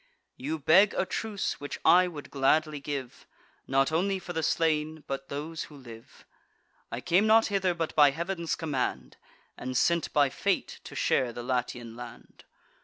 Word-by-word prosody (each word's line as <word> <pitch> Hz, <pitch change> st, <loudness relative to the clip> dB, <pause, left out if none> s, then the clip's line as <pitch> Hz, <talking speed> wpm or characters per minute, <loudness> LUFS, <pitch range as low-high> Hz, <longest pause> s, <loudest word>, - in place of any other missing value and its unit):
You 150 Hz, +5 st, -3 dB
beg 170 Hz, +7 st, +5 dB
a -, -, +1 dB
truce, 210 Hz, 0 st, -3 dB
which 145 Hz, -, -6 dB
I 180 Hz, +1 st, +6 dB
would 155 Hz, -5 st, -9 dB
gladly 150 Hz, +2 st, +2 dB
give, 140 Hz, -3 st, -6 dB, 0.4 s
Not 135 Hz, +2 st, +2 dB
only 190 Hz, +5 st, +1 dB
for 180 Hz, -1 st, -7 dB
the 160 Hz, -, -1 dB
slain, 155 Hz, -1 st, 0 dB
but 135 Hz, 0 st, -5 dB
those 155 Hz, +3 st, -5 dB
who 150 Hz, -, -14 dB
live. 115 Hz, -4 st, -13 dB, 0.7 s
I 120 Hz, -, -4 dB
came 185 Hz, +8 st, +3 dB
not 225 Hz, +1 st, +6 dB
hither 190 Hz, -3 st, +1 dB
but 165 Hz, -1 st, -3 dB
by 145 Hz, -2 st, +7 dB
Heav'n's 170 Hz, +3 st, -3 dB
command, 145 Hz, -6 st, -3 dB, 0.4 s
And 130 Hz, 0 st, -3 dB
sent 170 Hz, +3 st, +2 dB
by 145 Hz, -3 st, +3 dB
fate -, -, -1 dB
to -, -, -9 dB
share 125 Hz, -2 st, +1 dB
the 120 Hz, +1 st, -7 dB
Latian 120 Hz, -2 st, -3 dB
land. 120 Hz, -1 st, -12 dB
155 Hz, 165 wpm, -28 LUFS, 135-170 Hz, 0.7 s, by